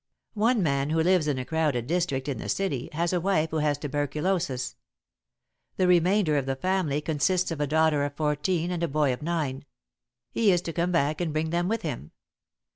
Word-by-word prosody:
"One 225 0 +2
man 140 -2 0
who 160 +1 +1
lives 180 -3 +3
in 145 -3 0
a 130 - -3
crowded 150 -7 0
district 150 -4 -1
in 140 - -3
the - - -6
city, 145 -11 -1
has 170 +3 -1
a 175 - +1
wife 165 -4 +1
who 160 - -1
has 150 -2 +1
tuberculosis. 145 -1 -2 1.0
The 185 - +3
remainder 180 -2 +3
of 135 -2 -1
the 135 - 0
family 165 -2 0
consists 170 +4 0
of 155 -3 -3
a 145 - +1
daughter 155 -1 +2
of 145 0 -3
fourteen 160 +4 0
and 175 -2 -3
a 170 - +1
boy 145 -2 +1
of 125 - -7
nine. 150 -5 -2 0.7
He 220 -4 +3
is 175 -1 +1
to 165 - -4
come 175 +2 0
back 155 -1 +1
and 170 -3 -1
bring 155 +1 -1
them 175 +1 0
with 225 +2 -1
him. 145 - -5
160 Hz, 200 wpm, -27 LUFS, 145-180 Hz, 1.0 s, lives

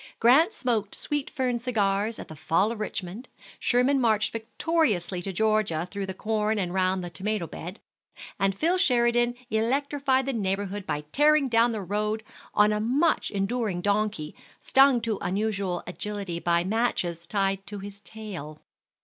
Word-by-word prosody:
Grant 275 - +5
smoked 230 - -1
sweet 290 -2 -2
fern 255 -4 -1
cigars 215 -3 0
at - - -8
the 160 - -10
fall 185 +8 +1
of 230 - -6
Richmond; 205 +2 -5 0.3
Sherman 260 +2 +2
marched 215 -3 +2
victoriously 225 - 0
to 195 - -4
Georgia 205 -5 +1
through 200 -1 -4
the 190 - -5
corn 215 +1 0
and 180 -3 -2
round 185 0 +1
the 175 - -6
tomato 195 +2 -2
bed, 175 +4 -8 0.6
and 195 0 +1
Phil 345 - +2
Sheridan 240 -4 +3 0.2
electrified 265 +4 +1
the 270 - -1
neighborhood 200 -2 -2
by 150 - -1
tearing 295 -1 +4
down 230 0 +4
the 220 -2 -3
road 210 +3 -1 0.3
on 210 0 +5
a 210 - 0
much 270 +10 +1
enduring 200 -2 -1
donkey, 205 -6 0 0.3
stung 270 -2 +4
to 225 -3 -2
unusual 195 -2 -1
agility 195 -1 -4
by 170 0 +2
matches 180 -5 -1
tied 195 -1 -1
to 205 - -6
his 200 0 -9
tail. 190 -10 -8
210 Hz, 155 wpm, -26 LUFS, 190-240 Hz, 0.6 s, Grant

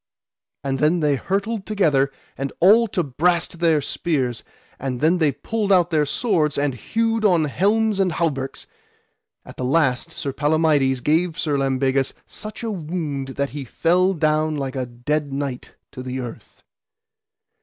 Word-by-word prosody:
And 135 -1 -1
then 160 +4 +2
they 145 -2 +3
hurtled 200 - -2
together 150 -10 +2 0.2
and 135 0 -3
all 220 +6 +6
to 185 -4 -1
brast 170 +5 0
their 165 -3 +3
spears, 135 -6 -2 0.4
and 130 -2 -3
then 165 +5 +3
they 155 -3 +3
pulled 200 - -2
out 175 -2 +4
their 150 -2 +2
swords, 155 - +1
and 140 -1 +1
hewed 225 - -1
on 180 -6 +4
helms 205 +7 +1
and 185 -3 +2
hauberks. 135 -5 -2 0.8
At - - -12
the - - -3
last 130 -2 +1
Sir 140 - -4
Palamides 145 -3 +2
gave 160 +4 +1
Sir 150 -3 0
Lambegus 135 0 +1
such 215 +2 -9
a 225 - -2
wound 155 -6 -3
that 140 0 -1
he 145 -1 -5
fell 180 +8 +2
down 155 -1 +1
like 135 -1 -3
a 130 -2 -2
dead 140 +5 -2
knight 135 -2 -4 0.2
to 130 - -8
the 130 0 -4
earth. 120 -3 -9
150 Hz, 155 wpm, -22 LUFS, 135-180 Hz, 0.8 s, all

